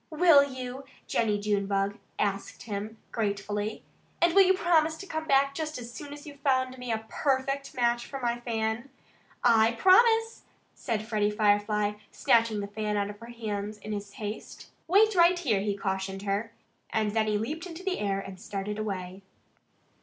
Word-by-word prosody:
"Will 315 -3 +6
you?" 260 -1 -6 0.2
Jennie 215 -3 +1
Junebug 200 0 0 0.2
asked 200 -1 -2
him 215 0 -5
gratefully. 205 -1 -2 0.4
"And 345 -1 +4
will 395 - +8
you 380 0 +5
promise 320 -3 +2
to 390 - -8
come 315 -3 -4
back 275 0 +4
just 310 0 -4
as 240 -1 -8
soon 290 +2 -8
as 290 0 -9
you've 285 -2 -11
found 260 -2 +1
me 250 -1 -4
a 220 0 -2
PERFECT 275 +2 -1
match 240 -1 +1
for 275 - -6
my 240 -1 -1
fan?" 225 +1 -2 0.5
"I 230 -1 +5
promise!" 450 - +4 0.3
said 220 -3 -3
Freddie 210 -2 +1
Firefly, 210 0 +1
snatching 225 -2 +2
the 200 - -4
fan 210 0 -2
out 205 0 -1
of 205 - -14
her 230 - -10
hands 215 -3 -4
in 210 +1 -8
his 205 -1 -6
haste. 210 0 -7 0.2
"Wait 420 +5 +5
right 350 -1 +5
here!" 250 - +1
he 200 0 -1
cautioned 195 0 -3
her. 205 +3 -1 0.4
And 215 -1 0
then 220 0 +1
he 210 -1 +1
leaped 310 - -4
into 345 +1 -9
the 380 -1 -1
air 195 -1 0
and 195 -1 -8
started 205 -1 -4
away. 190 -3 -4
225 Hz, 175 wpm, -28 LUFS, 205-280 Hz, 0.5 s, will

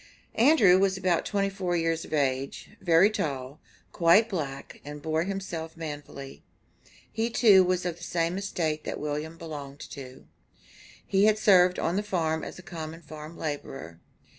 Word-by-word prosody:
Andrew 225 - +6
was 195 -1 +2
about 185 -3 +1
twenty 195 -1 0
four 185 -3 -1
years 165 0 0
of - - -14
age, 135 -2 -1
very 175 +3 +5
tall, 140 -6 -3 0.3
quite 180 +7 +4
black, 145 -9 -5
and 150 0 -8
bore 160 +2 -1
himself 175 -5 -5
manfully. 145 -3 -7 0.7
He 225 +1 -1
too 205 -5 +6
was 180 0 0
of 175 -2 -2
the - - -11
same 170 0 -1
estate 160 -6 -2
that - - -4
William 150 +2 -4
belonged 145 -3 -8
to. 130 -2 -10 0.8
He 195 +1 +3
had 215 0 +4
served 185 -4 +5
on 175 +3 0
the - - +2
farm 160 -6 -1
as - - -7
a 185 - -11
common 165 0 -7
farm 155 +2 -10
laborer. 135 - -6
165 Hz, 160 wpm, -27 LUFS, 150-190 Hz, 0.8 s, Andrew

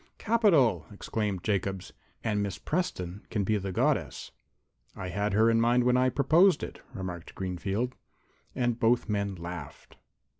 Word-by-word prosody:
"Capital!" 160 - +3
exclaimed 100 -2 -3
Jacobs. 95 -2 -2 0.3
"And 105 -2 0
Miss 100 -2 -3
Preston 105 - -3
can 105 -3 -1
be 105 +2 +1
the 95 0 -4
Goddess." - - 0 0.6
"I 95 - -5
had 100 +2 -1
her 110 +3 +4
in 115 0 +4
mind 120 +1 +3
when 125 0 +3
I 130 0 +4
proposed 155 +7 +4
it," - - -7
remarked 90 -4 -6
Greenfield. 95 +6 -2 0.6
And 120 -2 0
both 120 +2 +2
men 100 -2 -1
laughed. 85 -4 -8
105 Hz, 145 wpm, -29 LUFS, 95-125 Hz, 0.6 s, her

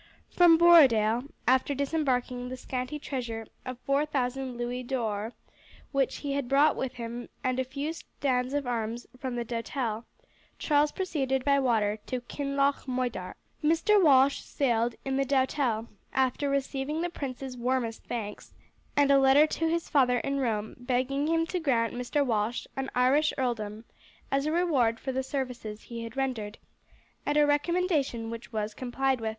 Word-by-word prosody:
From 345 -2 +6
Borodale, 255 -9 +6 0.2
after 260 +3 +3
disembarking 255 -4 -1
the 255 - -5
scanty 255 +3 -4
treasure 240 -6 -4 0.2
of 255 -1 -5
four 275 +1 +2
thousand 260 -3 -2
louis 240 +1 -3
d'or 230 -3 -2 0.6
which 275 -2 +1
he 280 - -1
had 275 -3 -2
brought 285 +2 +4
with 260 -1 -3
him 235 0 -6
and 255 -1 0
a - - +2
few 280 +4 -4
stands 260 -4 -2
of 290 -1 -1
arms 235 0 -3
from 255 -2 -3
the 240 -1 -2
Doutelle, 230 -1 -3 0.5
Charles 295 -1 +2
proceeded 270 -8 -1
by 280 -1 +4
water 220 -5 +1
to 255 - -2
Kinloch 275 +2 -1
Moidart. 250 -8 -2 0.3
Mr. 335 +7 +4
Walsh 275 -2 +5
sailed 235 -3 0
in 270 0 0
the 275 - +3
Doutelle, 260 -4 +1 0.3
after 265 +2 +1
receiving 275 +3 -1
the 350 - -1
prince's 265 -3 -5
warmest 245 -2 -1
thanks, 210 -4 -6 0.4
and 285 -1 +5
a 275 - +6
letter 270 +3 +6
to 325 +1 -1
his 335 0 -1
father 250 -4 +3
in 275 +2 -1
Rome 220 -4 -2
begging 260 +4 0
him 330 0 +2
to 360 +2 -2
grant 240 -8 +1
Mr. 250 +4 0
Walsh 225 -1 -1
an 270 0 -3
Irish 265 +5 +3
earldom 225 -4 -2 0.5
as 275 +2 +1
a - - +1
reward 280 -10 +2
for 265 - -3
the 265 0 -1
services 250 -6 -5
he 235 -1 -7
had 230 +3 -8
rendered, 235 -6 -2 0.7
a 295 +1 +3
recommendation 290 -6 0
which 230 0 -8
was 215 -1 -2
complied 260 +1 -1
with. 220 - -1
260 Hz, 160 wpm, -28 LUFS, 240-280 Hz, 0.7 s, From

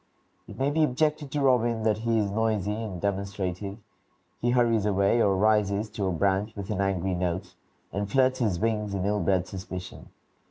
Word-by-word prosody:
It - - -10
may 135 +2 +1
be 155 +1 +2
objected 150 +1 0
to 145 +2 -2
Robin 120 -4 +2
that 110 -1 +2
he 115 0 +1
is 105 -2 0
noisy 105 -2 0
and 105 -4 -5
demonstrative; 100 0 -3 0.6
he 120 - +1
hurries 115 -4 +3
away 100 +3 +3
or 100 -3 +3
rises 105 0 +2
to 105 -3 -2
a - - 0
branch 100 +4 0
with 100 0 -5
an 100 -2 -1
angry 95 -1 0
note, 90 +1 -2 0.4
and 100 +1 -2
flirts 130 -1 +3
his 105 -8 +1
wings 105 -2 -1
in 95 -1 -1
ill 105 +1 +1
bred 95 -2 +1
suspicion. 95 -1 -8
105 Hz, 185 wpm, -27 LUFS, 95-115 Hz, 0.6 s, hurries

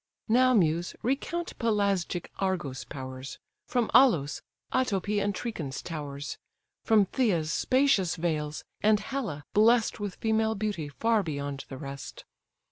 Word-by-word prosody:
Now, 255 +2 +5
Muse, 170 -3 +2
recount 310 +7 -2
Pelasgic 200 -6 0
Argos' 175 -9 -2
powers, 130 0 -7 0.3
From 245 -3 0
Alos, 165 - +5 0.3
Alopé, 205 -5 +1
and 200 -1 -1
Trechin's 165 - -4
towers: 145 -3 -5 0.4
From 215 -3 +5
Phthia's 185 - +1
spacious 255 -10 +3
vales; 155 -3 -2 0.2
and 210 0 +4
Hella, 215 - -4
bless'd 225 +2 +4
With 205 -3 -4
female 220 0 +1
beauty 195 -8 -2
far 225 +8 +2
beyond 140 -5 -4
the 135 - -6
rest. 140 -1 -8
195 Hz, 125 wpm, -28 LUFS, 150-225 Hz, 0.4 s, Now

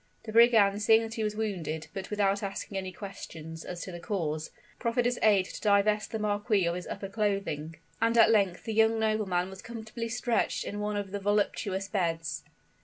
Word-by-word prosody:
The 220 - -6
brigand 220 -3 +5
seeing 220 +2 +5
that 225 0 -5
he 225 -1 -2
was 210 0 -1
wounded, 170 -8 -3
but 195 - -5
without 200 -1 +1
asking 200 0 -5
any 190 -1 -3
questions 165 -4 -8
as 175 -1 -6
to 185 - -7
the 175 - -7
cause, 160 -6 -2 0.3
proffered 235 0 0
his 245 0 +1
aid 200 -4 +5
to - - -8
divest 210 0 +2
the 220 - -1
marquis 205 -2 +1
of 170 - +1
his 180 0 -5
upper 195 - -5
clothing; 195 -7 -2 0.3
and 230 +1 +3
at 225 -1 +7
length 195 -5 +2
the 225 - -3
young 225 +1 +4
nobleman 200 -5 0
was 190 - -10
comfortably 230 0 -6
stretched 235 0 0
in 205 - -5
one 210 0 -1
of 200 -2 -4
the 200 - -3
voluptuous 200 -1 0
beds. 165 -5 -2
205 Hz, 195 wpm, -29 LUFS, 185-220 Hz, 0.3 s, at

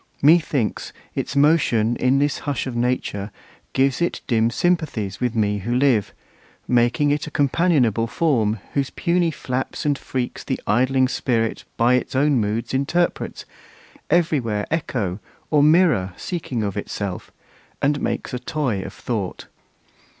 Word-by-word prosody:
Methinks, 150 -6 +2 0.2
its - - -3
motion 140 -6 +3
in 130 +2 +2
this 145 0 +1
hush 145 -5 -2
of 130 -3 -5
nature 120 -4 -1 0.4
Gives 135 +2 +2
it 170 - -1
dim 115 -3 +2
sympathies 120 - -1
with 125 -2 -1
me 105 -2 +1
who 120 +5 -2
live, 125 -6 +2 0.6
Making 125 +5 +2
it 150 +2 -1
a - - -4
companionable 140 - +2
form, 115 -7 +1 0.2
Whose 140 -2 0
puny 175 -1 +1
flaps 130 -3 -4
and 145 -1 +2
freaks 130 -2 -4
the - - -2
idling 130 +3 +3
Spirit 115 -3 -1
By 120 +2 +4
its 125 +1 0
own 140 -1 +3
moods 110 +3 -2
interprets, 160 +6 -1 0.6
every 165 -2 +3
where 105 -4 -2
Echo 115 - -2 0.3
or 150 -2 +5
mirror 150 - +4
seeking 140 - -3
of 100 -2 -2
itself, 100 -2 -4 0.5
And 145 +1 +1
makes - - -3
a 125 - -2
toy 125 -9 -2
of - - -7
Thought. 105 -7 -4
130 Hz, 145 wpm, -22 LUFS, 115-150 Hz, 0.6 s, or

